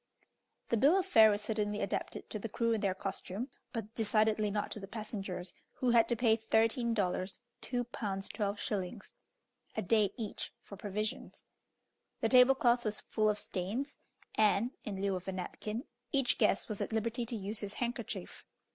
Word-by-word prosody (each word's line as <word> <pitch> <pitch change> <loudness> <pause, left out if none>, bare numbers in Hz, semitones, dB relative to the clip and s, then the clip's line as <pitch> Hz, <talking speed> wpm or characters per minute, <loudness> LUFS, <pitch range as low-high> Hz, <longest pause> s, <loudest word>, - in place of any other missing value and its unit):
The 230 - +3
bill 285 - +6
of 380 - +1
fare 225 -13 +7
was 205 0 0
certainly 210 -1 -1
adapted - - -3
to 215 - -3
the 225 - -4
crew 230 +2 +1
and 220 - -1
their 190 -2 +2
costume, 195 +5 -4 0.2
but 225 -2 -5
decidedly 215 -1 +2
not 205 0 -2
to - - -4
the 195 - -7
passengers, 200 -4 -5 0.2
who 250 -2 +1
had 235 -1 +5
to 240 - +3
pay 225 -1 +4
thirteen 225 +2 +2
dollars 190 +1 -1 0.2
(2 245 -1 -1
pounds 200 -5 -4
12s.) 205 -1 -3 0.6
a - - +2
day 215 -3 +4
each 220 -4 -4
for 200 - -10
provisions. 210 +2 -4 0.7
The - - +1
table 255 +1 +7
cloth 240 -1 +3
was 215 -1 +1
full 215 -1 +1
of 210 - +1
stains, 210 +9 -3 0.3
and, 215 +2 +3
in 200 -3 -4
lieu 195 -1 +1
of 185 +1 -6
a - - 0
napkin, 210 +5 -4 0.3
each 270 -3 +2
guest 210 -2 +3
was 215 -3 -4
at - - -2
liberty 230 +2 0
to 235 - -3
use 210 +1 -3
his 205 -1 -4
handkerchief. 240 0 -4
215 Hz, 175 wpm, -33 LUFS, 200-235 Hz, 0.7 s, fare